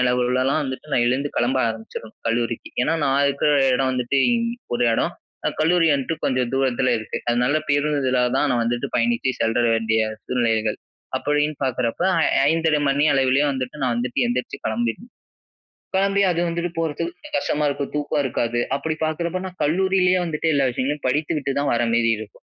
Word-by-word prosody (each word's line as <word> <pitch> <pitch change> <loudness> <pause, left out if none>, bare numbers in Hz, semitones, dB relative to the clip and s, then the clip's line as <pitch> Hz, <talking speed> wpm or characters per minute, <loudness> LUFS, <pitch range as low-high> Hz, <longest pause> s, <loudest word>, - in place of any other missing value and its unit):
அளவிலலாம் 125 +3 +1
வந்துட்டு 135 +3 -6
நான் 120 - +3
எழுந்து 135 +4 0
கிளம்ப 130 +2 +1
ஆரம்பிச்சுறனும் 110 0 -8
கல்லூரிக்கு. 115 0 -1
ஏன்னா 165 - +1
நான் 135 +1 +2
இருக்கிற 140 +2 +1 0.2
இடம் 130 0 +1
வந்துட்டு 125 +2 0
இ - - +4 0.4
ஒரு 120 0 +1
இடம். - - 0 0.3
அ - - +4
கல்லூரி 165 +1 +3
வந்துட்டு 140 +3 -1
கொஞ்சம் 125 -2 0
தூரத்தில 130 -1 +1
இருக்கு. 110 - -6
அதனால 125 +5 +2
பேருந்துதலா 145 -3 +1 0.2
தான் 145 - +2
நான் 120 -2 +1
வந்துட்டு 120 +1 -1
பயணித்து 120 +2 +1
செல்ற 115 +2 +2
வேண்டிய 110 0 +1 0.2
சூழ்நிலைகள். 110 -3 0 0.4
அப்படின்னு 150 +1 0
பார்க்குறப்போ 125 -3 -1 0.2
ஐ - - +3 0.2
5.30 160 -2 +2
மணி 140 +2 +2
அளவிலேயே 135 +2 +3
வந்துட்டு 130 +2 -5
நான் 125 -2 +1
வந்துட்டு 125 +1 0
எந்திரிச்சு 125 +3 -3
கிளம்பிடணும். 120 - -3 0.8
கிளம்பி 200 +1 +2
அது 170 - -1
வந்துட்டு 170 +1 -2
போறதுக்கு 165 - -2
கொஞ்ச 300 - -13
கஷ்டமா 150 - -1
இருக்கும். 140 0 -3
தூக்கம் 145 0 0
இருக்காது. 120 -2 -1 0.2
அப்படி 155 +2 -2
பார்க்கிறப்போ 170 +3 -2
நான் 185 0 -10
கல்லூரியிலேயே 185 +3 +2
வந்துட்டு 160 0 -2
எல்லா 140 -2 +3
விஷயங்களையும் 140 +4 -3
படித்து 150 +5 0
விட்டு 140 -1 -2
தான் 145 - 0
வர 120 - +1
மாரி 115 0 +3
இருக்கும். 110 -1 -11
135 Hz, 165 wpm, -22 LUFS, 120-150 Hz, 0.8 s, இ